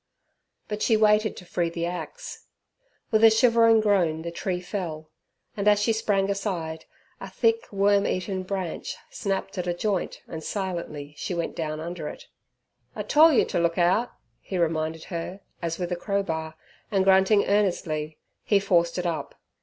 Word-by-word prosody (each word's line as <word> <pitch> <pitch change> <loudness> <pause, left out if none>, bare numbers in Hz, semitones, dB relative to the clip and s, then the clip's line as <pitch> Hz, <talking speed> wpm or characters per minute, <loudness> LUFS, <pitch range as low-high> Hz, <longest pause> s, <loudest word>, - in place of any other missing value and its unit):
But 210 0 -4
she 225 - +3
waited 215 0 +3
to 180 - -10
free 175 -1 -1
the 170 0 -3
axe. 180 - -7 0.6
With 220 0 +3
a 225 - +10
shivering 230 0 +5
groan 175 -7 +2
the 170 - -4
tree 180 +1 -2
fell, 170 -4 -5 0.4
and 205 0 -2
as 205 -1 +6
she 225 +2 +2
sprang 200 -3 +1
aside, 170 -6 -3 0.3
a - - -7
thick 455 0 +1
worm 200 0 +3
eaten 185 +1 -2
branch 185 -2 -4 0.2
snapped 195 -1 -3
at 180 - -3
a 175 - 0
joint 195 0 -2
and 160 -1 -7
silently 170 -7 -4
she 180 - -3
went 170 -1 -3
down 155 -1 -3
under 170 -1 -5
it. - - -8 0.7
"I - - -3
tole 320 +2 +6
yer 270 - +4
t' - - -1
look 170 0 +1
out," 185 +7 +3 0.3
he 190 - -5
reminded 160 -1 -1
her, 175 +3 -5 0.2
as 165 -1 -2
with 180 -1 -3
a - - +1
crowbar, 170 -5 -2 0.3
and 195 -3 +2
grunting 190 +2 +5
earnestly, 165 -7 0 0.3
he 205 - +3
forced 170 -3 +2
it 180 - -2
up. 165 -2 -3
185 Hz, 170 wpm, -26 LUFS, 170-205 Hz, 0.7 s, a